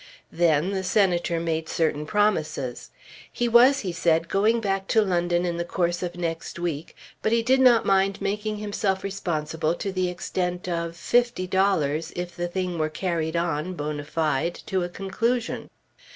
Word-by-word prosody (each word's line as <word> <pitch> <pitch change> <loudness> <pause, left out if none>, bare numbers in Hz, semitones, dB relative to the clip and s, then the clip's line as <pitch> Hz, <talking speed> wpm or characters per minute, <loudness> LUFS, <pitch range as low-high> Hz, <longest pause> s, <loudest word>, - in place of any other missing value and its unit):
Then 165 +1 +2
the 190 -1 -2
Senator 180 -3 +2
made 160 -1 -2
certain 150 -2 0
promises. 160 - 0 0.4
He 240 - -1
was, 245 +4 +6
he 185 - -3
said, 165 -1 +1
going 215 +4 +3
back 195 -2 -1
to 220 - +4
London 175 -2 +1
in 170 -1 -2
the 170 - -1
course 175 0 -1
of 175 -1 -4
next 165 -1 -4
week, 165 -3 -4 0.3
but 220 - 0
he 230 0 +3
did 260 +3 +3
not 245 -3 +5
mind 195 0 +2
making 210 +2 -2
himself 205 -2 -1
responsible 165 -4 -2
to 195 - -3
the 185 -1 0
extent 180 0 -3
of 170 -1 -2
fifty 240 +3 +1
dollars 170 -5 +1
if 175 -1 -5
the 175 0 -2
thing 180 -1 -3
were 155 0 +1
carried 165 0 -2
on, 170 +1 -1
bonâ 150 0 -3
fide, 155 +1 0
to 190 -1 0
a 175 - -2
conclusion. 225 +6 -2
180 Hz, 165 wpm, -25 LUFS, 165-195 Hz, 0.4 s, was